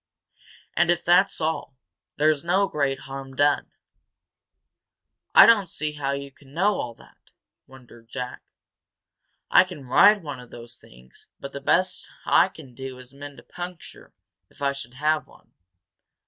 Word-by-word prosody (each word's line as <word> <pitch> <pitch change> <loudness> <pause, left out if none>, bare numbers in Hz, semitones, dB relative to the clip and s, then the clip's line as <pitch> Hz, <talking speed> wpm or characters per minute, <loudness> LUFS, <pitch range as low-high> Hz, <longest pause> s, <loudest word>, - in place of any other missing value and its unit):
And 175 0 +3
if 175 0 +1
that's 180 +3 +4
all, 155 -4 -3 0.4
there's 155 0 +2
no 190 +4 +2
great 140 -5 -1
harm 135 0 -8
done." 145 +1 +2 1.7
"I - - +11
don't 205 -6 +5
see 155 -1 -3
how 140 -2 -3
you 140 0 -6
know 175 +9 0
all 120 -1 -5
that!" - - -22 0.4
wondered 120 -3 -17
Jack. 125 -1 -6 1.1
"I - - +8
can 180 -7 -10
ride 200 +9 +5
one 145 -4 -6
of 125 -1 -13
those 120 +1 -11
things, 60 +1 -18
but 140 - -8
the 140 - -6
best 185 +6 +1 0.2
I - - +5
can 145 -8 -14
do 130 0 -8
is 130 +1 -13
mend 145 0 -10
a - - -14
puncture, 175 -1 -10 0.4
if - - -23
I 140 -1 +1
should 140 -2 -9
have 155 +3 0
one." - - -22
140 Hz, 150 wpm, -24 LUFS, 130-170 Hz, 1.7 s, I